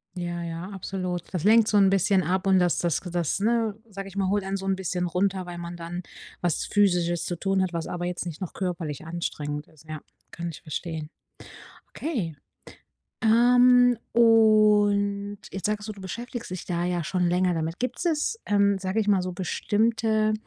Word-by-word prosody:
Ja, 175 -1 -4
ja, 170 +2 -5
absolut. 185 -3 -4
Das 180 -4 -3
lenkt 220 +2 +6
so 210 - +3
'n 195 -1 +6
bisschen 195 -1 +3
ab 185 +2 0
und 190 -1 +5
das 175 -1 +2
das 170 -4 +1
das 175 -1 -2
ne, 225 -1 +1
sage 195 -1 -7
ich 195 - -12
mal, 195 -2 0
holt 205 0 +1
einen 195 +1 -2
so 195 - -7
'n 195 0 +1
bisschen 180 -1 -2
runter, 185 +1 0
weil 175 -1 -7
man 175 0 -6
dann 175 +1 -5 0.4
was 175 -4 0
Physisches 175 -4 +2
zu 175 - -2
tun 195 +2 0
hat, 185 -1 0
was 165 -1 -3
aber 175 0 -4
jetzt 180 0 -3
nicht 170 0 -7
noch 185 - -5
körperlich 165 -5 -4
anstrengend 150 -3 -4
ist. 155 0 -21
Ja, 155 -1 -6 0.3
kann 170 0 -5
ich 160 - -9
verstehen. 155 0 -5 0.8
Okay, 215 - -3 0.9
ähm, 245 +1 +5
und 210 -3 +4
jetzt 195 +1 -3
sagst 210 0 -2
du, - - -3
du 200 - -13
beschäftigst 235 +5 -6
dich 185 -1 -5
da 175 -1 -2
ja 175 -2 -1
schon 180 0 0
länger 180 +1 +2
damit. 165 +1 -3
Gibt 250 +4 -3
es, 330 +7 0
ähm, 200 -1 +3
sage 190 +3 -1
ich 210 - -1
mal, 195 -2 +4
so 180 0 -4
bestimmte, 215 +3 +1
190 Hz, 190 wpm, -26 LUFS, 175-210 Hz, 0.9 s, lenkt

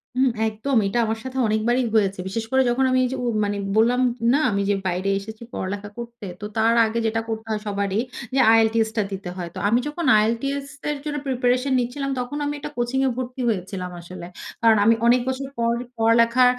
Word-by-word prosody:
হুম, 260 +1 +3 0.2
একদম। 220 +6 -2
এইটা 195 +5 0
আমার 220 0 -2
সাথে 260 0 -6
অনেকবারই 225 +4 +1
হয়েছে। 195 -3 +2
বিশেষ 225 +4 -3
করে 265 0 +4
যখন 245 +2 +1
আমি 255 - +3
এইযে 260 +1 -3
উম 235 -2 0
মানে 205 0 -2 0.2
বললাম 240 +3 +4 0.3
না? 285 - +3
আমি 200 0 0
যে 205 - +3
বাইরে 185 +2 -1
এসেছি 220 +3 -9
পড়ালেখা 200 +2 -4
করতে। 235 -2 -8 0.2
তো - - -4
তার 225 +1 +4
আগে 220 +1 -1
যেটা 225 +1 0
করতে 220 0 -4
হয় 215 -1 -1
সবারই 200 0 -1 0.4
যে - - +3
আইএলটিএসটা 225 0 +3
দিতে 195 -2 -5
হয়। 175 -2 -5
তো - - -4
আমি 230 +4 +3
যখন 315 +3 -4
আইএলটিএস 275 +6 0 0.2
এর 295 - -1
জন্য 295 -1 -3
প্রিপারেশন 255 +1 +1
নিচ্ছিলাম 275 +3 -2
তখন 250 +4 -4
আমি 290 - -1
একটা 290 - -6
কোচিং 240 +2 0
এ - - +2
ভর্তি 255 0 -4
হয়েছিলাম 185 -3 -3
আসলে। 175 0 -9 0.3
কারণ 225 -2 +5
আমি 230 +1 +6
অনেক 245 +1 +5
বছর 265 +1 -3
পর 235 0 +2 0.2
পড়ালেখা 230 +2 +4
230 Hz, 200 wpm, -23 LUFS, 210-255 Hz, 0.4 s, আমি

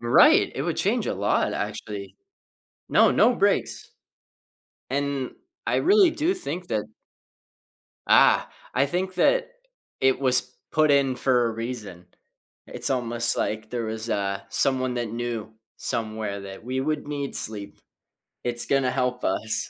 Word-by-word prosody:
Right. 120 0 +5
It - - -2
would - - -2
change - - 0
a - - -1
lot, - - +1
actually. 100 -2 -5 0.7
No, - - +5
no 245 - +4
breaks. 130 - 0 1.0
And 140 -1 -2 0.4
I - - +1
really 390 -2 +5
do 325 +4 0
think 185 - -5
that 110 -2 -1 1.2
Ah. - - +5 0.3
I 140 +2 +4
think 185 +4 -2
that - - +2 0.5
it 130 -1 +3
was 130 -2 +1 0.2
put 155 -1 +4
in 140 -2 +3
for 125 -2 +2
a - - 0
reason. 110 -6 -6 0.6
It's - - -3
almost 120 -2 0
like 110 +1 -2
there 120 -2 -2
was, 110 +1 -4
uh, 100 -1 -1
someone 130 -2 +1
that 120 -2 -2
knew 115 -2 -4 0.2
somewhere 110 -3 -3
that 95 +2 -10
we 130 +2 -2
would 155 +1 -2
need 140 -2 -3
sleep. 105 -2 -4 0.7
It's 120 -1 -1
gonna 135 -2 +2
help 125 -1 -1
us. 110 +4 -1
125 Hz, 140 wpm, -25 LUFS, 110-140 Hz, 1.2 s, Right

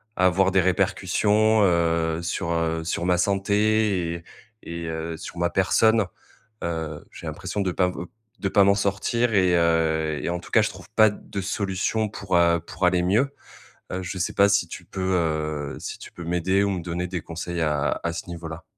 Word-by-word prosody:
avoir 95 +1 +3
des 95 0 +4
répercussions, 100 +4 +2
heu, 85 -2 +2
sur, 85 0 -2
heu, 80 0 -1
sur 85 +1 -2
ma 90 -1 +3
santé 100 -2 +1
et 85 - -8 0.4
et 85 0 -6
heu, 80 0 -4
sur 85 - -9
ma 85 0 +1
personne. 110 +4 +3 0.6
Heu, 80 -3 -4
j'ai - - -9
l'impression 105 - -4
de 95 -2 0
pas, 90 +1 +2
heu, 90 -1 -6 0.3
de 95 - -1
pas 100 - +5
m'en 100 0 +5
sortir 105 +4 0
et 90 -3 +4
heu 80 -2 +1
et - - -1
en 85 0 -2
tout - - -13
cas, - - +5
je - - +1
trouve - - -12
pas 110 -1 +7
de 100 - -7
solution 100 +2 -1
pour, 95 -3 -3
heu, 85 0 +4
pour 85 +3 -3
aller 90 0 +3
mieux. 115 +10 +2 0.6
Heu, 95 +1 -3
je 90 +1 -5
sais 90 - -2
pas 100 0 +5
si 100 -4 +2
tu - - -8
peux, 95 - -7 0.2
heu, 75 -3 -2
si - - -6
tu - - -11
peux 85 - -9
m'aider 90 +3 +1
ou - - +1
me 90 -3 -2
donner 90 +1 -3
des 90 -2 -4
conseils 85 +1 -5
à 75 -2 0
à 85 - 0
ce 85 - -6
niveau-là? 85 0 -7
90 Hz, 200 wpm, -24 LUFS, 85-100 Hz, 0.6 s, pas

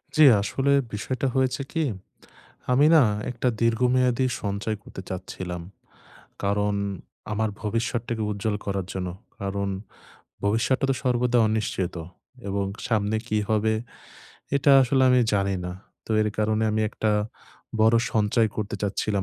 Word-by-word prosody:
জী 155 - +6 0.2
আসলে 135 +7 +1 0.2
বিষয়টা 130 +6 -2
হয়েছে 130 0 +1
কি? 165 -1 0 0.9
আমি 140 +4 +5
না 155 - +8 0.3
একটা 125 +1 -1
দীর্ঘমেয়াদী 125 +2 +2 0.2
সঞ্চয় 100 +2 -2
করতে - - -9
চাচ্ছিলাম। 90 -1 -5 0.8
কারণ 100 +1 +1 0.6
আমার 110 0 0
ভবিষ্যতটাকে 115 +1 -2
উজ্জ্বল 105 +1 -1
করার 95 -2 -2
জন্য। 90 -1 -3 0.3
কারণ 100 0 -2 0.8
ভবিষ্যৎটা 115 +6 +2
তো 135 - +2
সর্বদা 125 -1 +2
অনিশ্চিত 105 -5 -1 0.5
এবং 100 0 -1 0.2
সামনে 110 -2 +1
কি 110 - 0
হবে, 110 0 +2 0.8
এটা 140 +1 +3
আসলে 130 +1 +2
আমি 125 0 +5
জানি 100 -1 +1
না। 90 - -4 0.3
তো - - -11
এর 105 - +2
কারণে 110 +1 +1
আমি 110 - +1
একটা 110 0 -1 0.7
বড় 110 +1 +5 0.2
সঞ্চয় 110 +1 +2
করতে 105 -1 -3
চাচ্ছিলাম 100 0 0
110 Hz, 130 wpm, -25 LUFS, 100-125 Hz, 0.9 s, না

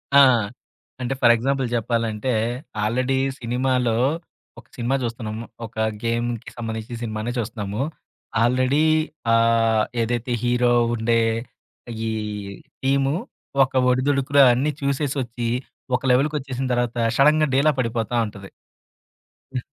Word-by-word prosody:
ఆ! - - +10 0.8
అంటే 125 +1 -1
for 120 -1 +7
example 135 +2 0
జెప్పాలంటే, 115 0 -1 0.5
ఆల్రెడీ 125 +5 +1 0.2
సినిమాలో 125 0 0 0.6
ఒక - - -17
సినిమా 120 +3 0
జూస్తున్నాము. 115 -2 -4 0.2
ఒక 110 - -13 0.3
గేమ్‌కి 115 0 -2
సంబంధించిన 110 0 -5
సినిమానే 110 +1 -3
చూస్తున్నాము. 110 -1 -3 0.6
ఆల్రెడీ 130 +4 +2 0.5
ఆహ్, 115 -1 +3 0.2
ఏదైతే 120 +1 -2
హీరో 120 0 +2 0.2
ఉండే 115 0 +2 0.9
ఈ - - -1 0.7
టీము 135 +1 +2 0.5
ఒక 130 - -3 0.2
ఒడిదుడుకులు 140 +2 +3
అన్నీ 135 +5 +1
చూసేసొచ్చి, 135 -4 -1 0.5
ఒక - - -17
లెవెల్‌కొచ్చేసిన 135 -1 0
తర్వాత 120 -1 -1 0.2
షడన్‌గా 150 +2 +4
డీలా 150 +3 +4
పడిపోతా 115 0 -2
ఉంటది. 100 -2 -10 1.0
హ్మ్. 130 - -1
120 Hz, 105 wpm, -23 LUFS, 115-135 Hz, 1.0 s, ఆ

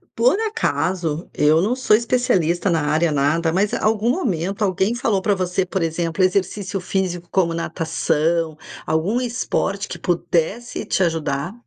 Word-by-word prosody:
Por 250 - +3
acaso, 185 - -1
eu 155 +2 +3
não 220 +7 +1
sou 255 -4 +2
especialista 210 - +1
na 165 -3 +2
área 155 +3 +1
nada, 150 +4 +1
mas 195 +4 +1
algum 215 +1 +1
momento 195 - -2
alguém 195 +3 +1
falou 225 -5 0
pra 205 +1 +2
você, 185 0 -1
por 185 +1 -2
exemplo, 165 +2 -1
exercício 195 +1 0
físico 180 -1 -2
como 175 -3 +1
natação, 165 -1 -1 0.3
algum 180 +10 0
esporte 230 -5 -2
que - - -6
pudesse 175 +6 -1
te 190 - +1
ajudar? 160 0 -1
185 Hz, 145 wpm, -21 LUFS, 165-210 Hz, 0.3 s, Por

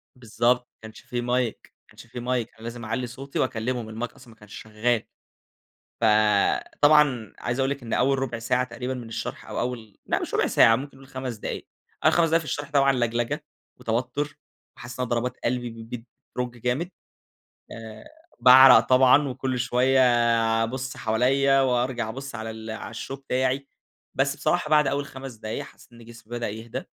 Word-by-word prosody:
بالضبط. 125 +1 0
ما - - -61
كانش 110 0 -11
في 125 -1 -4
mic. 125 -1 -2
ما - - -
كانش - - -14
في 120 - -8
mic. 120 -1 -1
أنا 110 - -14
لازم 115 0 -6
أعلي 120 +3 -2
صوتي 135 +3 -6
وأكلّمهم 115 -2 -2
الmic - - -13
أصلًا 125 -2 -16
ما 110 - -27
كانش 105 -1 -14
شغّال. 110 +2 0 1.0
ف - - +3 0.8
طبعًا 145 -7 +4
عايزة 120 +2 -3
أقول 135 - +1
لِك 140 -2 -4
إن 115 - -5
أول 135 +2 +2
رُبع 120 -3 -3
ساعة 125 +2 +1
تقريبًا 125 +1 -5
من 120 -3 -7
الشرح 115 0 -6
أو - - -5
أول 115 -4 -4
لأ - - 0
مش - - -5
رُبع - - +2
ساعة، 115 - +6
ممكن 135 +2 -7
نقول 135 0 -15
5 130 -3 -5
دقايق. 105 - -6 0.4
أول - - +5
5 170 -1 +4
دقايق 165 - +4
في 160 - -9
الشرح 145 +2 -4
طبعًا 140 -1 +4
لَجلَجة 120 -1 -1 0.3
وتوتُّر 130 +6 -2 0.4
وحاسس 120 +1 -9
إن - - +1
أنا 125 - -4
ضربات 120 +1 -1
قلبي 120 0 -1
ب 115 0 -11 0.5
بترُج 125 -1 -3
جامد. 125 +9 -1 0.8
آآ 110 -1 -10 0.4
باعرَق 130 -1 +9
طبعًا 130 +4 +5
وكل 130 0 -3
شوية 125 +2 +2 0.6
أبُص 130 +3 -4
حواليّا 135 +5 +2
وأرجع 125 -2 0
أبُص 135 +3 -7
على 110 -1 -5
ال 110 0 -8
على 110 0 -7
الshow 115 - -6
بتاعي. 135 0 -1 0.5
بس 140 +1 +1
بصراحة 150 +1 0
بعد 150 -1 +5
أول 140 +1 -1
5 130 -2 -9
دقايق، 110 0 -5
حسّيت - - -17
إن 115 -1 -14
جسمي 115 -1 -15
بدأ 120 - -2
يهدى، 110 +2 -6
125 Hz, 180 wpm, -25 LUFS, 115-135 Hz, 1.0 s, باعرَق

